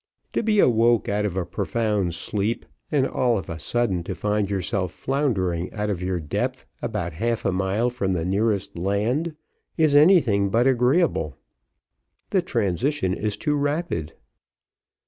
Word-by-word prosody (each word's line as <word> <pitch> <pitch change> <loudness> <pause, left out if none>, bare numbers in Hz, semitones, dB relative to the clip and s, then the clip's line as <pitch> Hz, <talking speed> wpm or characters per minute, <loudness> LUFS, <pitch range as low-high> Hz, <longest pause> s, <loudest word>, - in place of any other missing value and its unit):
To - - +1
be 215 -2 +1
awoke 120 - +4
out 105 +1 0
of 95 -2 -2
a 90 - 0
profound 100 -1 -1
sleep, 105 +5 -2 0.3
and 140 -4 +3
all 120 -3 +1
of 95 - -5
a 80 - -6
sudden 115 -3 0
to 95 - -4
find 105 +2 0
yourself 95 -2 -1
floundering 95 - -1
out 105 -1 -1
of 90 -3 -3
your 90 -1 -1
depth 75 -3 -3 0.2
about 95 -7 -3
half 115 +7 -1
a - - +2
mile 95 +6 0
from 100 -6 -1
the 85 -2 -1
nearest 100 +1 0
land, 115 - 0 0.4
is 155 -3 +3
anything 145 - +5
but 115 +5 +2
agreeable; 130 - +2 0.9
the - - +3
transition 100 - 0
is 105 +1 -2
too 150 +6 0
rapid. 145 - -1
105 Hz, 150 wpm, -24 LUFS, 95-125 Hz, 0.9 s, anything